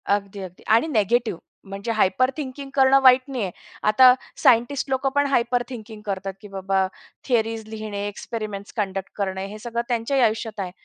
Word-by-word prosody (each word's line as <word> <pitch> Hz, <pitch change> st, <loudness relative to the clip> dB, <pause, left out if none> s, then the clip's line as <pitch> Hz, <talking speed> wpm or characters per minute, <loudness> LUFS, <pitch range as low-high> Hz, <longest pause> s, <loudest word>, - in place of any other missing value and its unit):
अगदी, 200 Hz, 0 st, 0 dB
अगदी 185 Hz, -1 st, -10 dB
आणि 230 Hz, +8 st, +2 dB
निगेटिव्ह 230 Hz, -, +1 dB, 0.3 s
म्हणजे 200 Hz, +4 st, -4 dB
हायपर 225 Hz, +4 st, +2 dB
थिंकिंग 275 Hz, -1 st, -6 dB
करणं 270 Hz, 0 st, +5 dB
वाईट 255 Hz, -1 st, +7 dB
नाहीये. 240 Hz, -8 st, -2 dB, 0.3 s
आता 250 Hz, +4 st, +7 dB, 0.3 s
सायंटिस्ट 250 Hz, +4 st, +3 dB
लोकं 265 Hz, +1 st, +1 dB
पण 285 Hz, 0 st, +3 dB
हायपर 245 Hz, -2 st, +1 dB
थिंकिंग 220 Hz, -3 st, -9 dB
करतात, 195 Hz, -1 st, -3 dB
की 210 Hz, -, -10 dB
बाबा 190 Hz, -1 st, 0 dB, 0.4 s
थियरीज 225 Hz, -2 st, 0 dB
लिहिणे, 215 Hz, -2 st, -5 dB
एक्सपेरिमेंट्स 205 Hz, -1 st, -6 dB
कंडक्ट 195 Hz, -2 st, -2 dB
करणे, 190 Hz, -1 st, -2 dB
हे 210 Hz, +2 st, -9 dB
सगळं 235 Hz, +1 st, -3 dB
त्यांच्याही 245 Hz, +3 st, 0 dB
आयुष्यात 220 Hz, -1 st, 0 dB
आहे. 185 Hz, -2 st, -3 dB
220 Hz, 160 wpm, -23 LUFS, 200-250 Hz, 0.4 s, वाईट